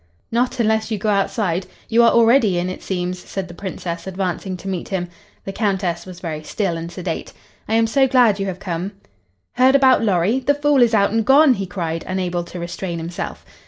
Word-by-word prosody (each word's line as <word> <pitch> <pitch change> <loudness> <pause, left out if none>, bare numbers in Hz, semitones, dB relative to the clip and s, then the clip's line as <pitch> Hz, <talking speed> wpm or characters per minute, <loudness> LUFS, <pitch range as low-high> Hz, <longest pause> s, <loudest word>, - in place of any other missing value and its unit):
"Not 245 +2 0
unless 220 -1 +1
you 220 - -1
go 210 +2 -1
outside. 195 -3 0 0.2
You 230 +1 +4
are 235 - +6
already 230 -4 +4
in, 180 +1 -1
it - - -8
seems," 180 -1 -3
said 190 +1 -6
the 175 - -11
Princess, 175 -2 -6
advancing 185 0 -3
to 195 - -10
meet 185 -3 -4
him. 180 -3 -2 0.4
The 195 - -4
Countess 190 -5 -1
was 180 -1 -9
very 160 -4 -5
still 180 +2 -2
and 165 +1 -6
sedate. 175 -2 -5 0.3
"I 220 - 0
am 225 0 +4
so 265 +4 +3
glad 240 -6 +4
you 195 - -1
have 185 -2 -4
come." 180 +2 -4 0.6
"Heard 260 +2 +4
about 265 -3 +5
Lorry? 200 +4 +2
The 285 +2 +1
fool 290 -2 +3
is 235 -2 +4
out 200 -1 +3
and 225 +1 +1
gone," 275 +3 +6
he 195 -4 -4
cried, 165 -3 -3
unable 180 -2 -2
to 175 - -9
restrain 170 0 -4
himself. 165 +1 -6
195 Hz, 205 wpm, -20 LUFS, 175-230 Hz, 0.6 s, are